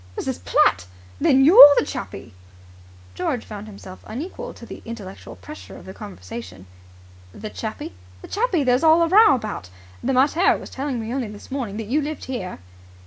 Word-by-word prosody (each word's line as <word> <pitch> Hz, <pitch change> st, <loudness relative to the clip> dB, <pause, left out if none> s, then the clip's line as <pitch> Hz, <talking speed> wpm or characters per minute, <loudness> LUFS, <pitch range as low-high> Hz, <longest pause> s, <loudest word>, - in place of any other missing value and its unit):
Mrs. 85 Hz, -, -4 dB
Platt! 90 Hz, 0 st, +2 dB, 0.3 s
Then 270 Hz, 0 st, +4 dB
you're 300 Hz, -, +10 dB
the -, -, +3 dB
Chappie?" -, -, -7 dB, 0.8 s
George 225 Hz, -, -3 dB
found 210 Hz, 0 st, -9 dB
himself 195 Hz, -3 st, -12 dB
unequal 360 Hz, -, -6 dB
to -, -, -12 dB
the -, -, -10 dB
intellectual 210 Hz, -5 st, -9 dB
pressure 305 Hz, +1 st, -11 dB
of -, -, -14 dB
the 190 Hz, -, -9 dB
conversation. 95 Hz, -, -10 dB, 0.7 s
"The 215 Hz, 0 st, -8 dB
Chappie?" 220 Hz, -, -6 dB, 0.3 s
"The -, -, -9 dB
Chappie 405 Hz, -8 st, 0 dB
there's 250 Hz, 0 st, +2 dB
all 325 Hz, +1 st, +5 dB
the 365 Hz, -, 0 dB
row 435 Hz, -6 st, +7 dB
about. 215 Hz, -, -6 dB, 0.3 s
The 270 Hz, -, 0 dB
mater 290 Hz, +8 st, +3 dB
was -, -, -11 dB
telling 270 Hz, -2 st, -3 dB
me 225 Hz, +1 st, -5 dB
only 260 Hz, -4 st, -2 dB
this 210 Hz, +3 st, -12 dB
morning 240 Hz, -7 st, -4 dB
that 225 Hz, -, -5 dB
you 275 Hz, +8 st, 0 dB
lived 300 Hz, +1 st, -5 dB
here." 240 Hz, -9 st, -5 dB
245 Hz, 175 wpm, -22 LUFS, 205-295 Hz, 0.8 s, you're